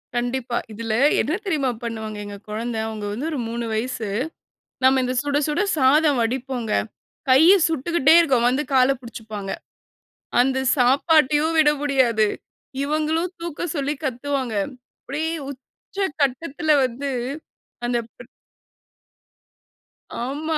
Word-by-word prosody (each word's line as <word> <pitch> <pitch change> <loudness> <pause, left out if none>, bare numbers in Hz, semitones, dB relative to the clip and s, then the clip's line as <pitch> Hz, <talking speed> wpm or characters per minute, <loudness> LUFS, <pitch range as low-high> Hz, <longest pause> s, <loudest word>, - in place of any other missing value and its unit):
கண்டிப்பா. 240 0 -1 0.2
இதில, 225 0 -3 0.3
என்ன 310 - -1
தெரியுமா 295 -9 0
பண்ணுவாங்க 220 -2 -5
எங்க 205 0 -8
கொழந்த? 230 +2 -3
அவுங்க 215 -2 -5
வந்து 265 +9 -3
ஒரு 285 - -3
3 235 0 -3
வயசு. 220 -1 -2 0.7
நம்ம 260 0 +5
இந்த 250 0 -1
சுட, 290 0 0
சுட 300 +5 0 0.2
சாதம் 285 0 +4
வடிப்போங்க. 245 -1 -2 0.6
கைய 315 +9 +7
சுட்டுக்கிட்டே 320 0 +3
இருக்கும். 260 -8 +3
வந்து 260 +4 +1
கால 255 0 +5
புடிச்சுப்பாங்க. 220 -4 -7 0.9
அந்த 265 +1 +1 0.2
சாப்பாட்டையும் 295 +4 +3
விட 305 -1 +6
முடியாது. 250 -7 +2 0.6
இவங்களும் 310 +4 0
தூக்க 340 0 -4
சொல்லி 285 0 -1
கத்துவாங்க. 260 -2 -2 0.5
அப்டியே 315 +4 -2 0.2
உச்சகட்டத்தில 290 +1 -3
வந்து 260 +3 -4 0.8
அந்த 240 0 +1 0.2
ப் 245 - -13 2.0
ஆமா. 305 +4 -2
265 Hz, 110 wpm, -22 LUFS, 240-300 Hz, 2.0 s, கைய